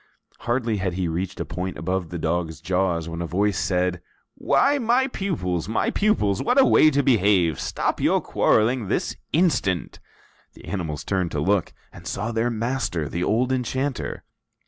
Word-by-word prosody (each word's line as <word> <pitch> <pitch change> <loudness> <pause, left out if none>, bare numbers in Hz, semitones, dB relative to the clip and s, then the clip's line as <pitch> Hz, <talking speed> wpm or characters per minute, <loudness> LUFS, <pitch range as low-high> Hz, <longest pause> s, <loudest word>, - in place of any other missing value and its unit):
Hardly 120 -3 -1
had 95 -2 -2
he 90 0 -1
reached 90 +4 -3
a - - -2
point 90 +2 -4
above 90 +2 -2
the 85 - -5
dog's 80 0 -2
jaws 90 -3 0
when 85 0 -5
a 85 - -3
voice 100 +3 0
said: 90 -1 0 0.3
"Why, 285 +1 +2
my 245 +2 +2
pupils, 125 - -2
my 110 - 0
pupils! 200 - +1
What 250 +3 +2
a 265 - +7
way 155 - +6
to 140 -1 +1
behave! 100 - +3
Stop - - -2
your - - +3
quarreling 115 0 +1
this - - -1 0.2
instant!" 125 - +1 0.5
The - - -15
animals 80 -5 -4
turned 95 -3 -1
to 75 - -1
look, 95 +4 +1 0.2
and - - -11
saw 105 +4 -3
their 115 +1 0
master, 115 - -2
the 85 +2 -2
old 120 +7 +1
enchanter. 130 +1 -2
95 Hz, 170 wpm, -23 LUFS, 90-125 Hz, 0.5 s, a